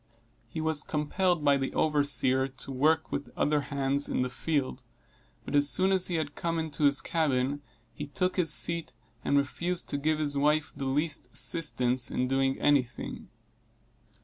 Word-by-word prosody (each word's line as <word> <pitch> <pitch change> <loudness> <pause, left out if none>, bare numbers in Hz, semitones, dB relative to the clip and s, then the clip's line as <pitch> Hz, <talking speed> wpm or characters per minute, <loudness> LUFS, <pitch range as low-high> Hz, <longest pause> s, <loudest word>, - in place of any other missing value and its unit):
He 120 - -7
was 160 -1 -1
compelled 155 +2 -1
by 140 -1 +5
the 135 -1 -3
overseer 140 -3 +1
to 135 +1 -9
work, 155 +5 +1
with 140 - -3
the - - -20
other 150 0 +2
hands, 140 0 -1
in - - 0
the 125 - -4
field, 145 0 -2 0.6
but - - -6
as 145 0 +4
soon 190 +5 +2
as 190 -1 +2
he 175 - -2
had 155 -3 -2
come 165 -1 -2
into 155 -2 -1
his 140 -1 +3
cabin, 145 -3 0 0.3
he 145 - -7
took 180 +5 -1
his 170 -4 +2
seat, 170 +2 +5 0.3
and 140 - +2
refused 170 +6 -2
to 145 - -2
give 155 +2 0
his 145 -2 0
wife 150 +2 +1
the 135 - -5
least 150 +3 -1
assistance 130 -6 0
in 125 - -1
doing 135 0 0
any 145 -2 +4
thing. 120 -2 -9
145 Hz, 175 wpm, -28 LUFS, 135-160 Hz, 0.6 s, by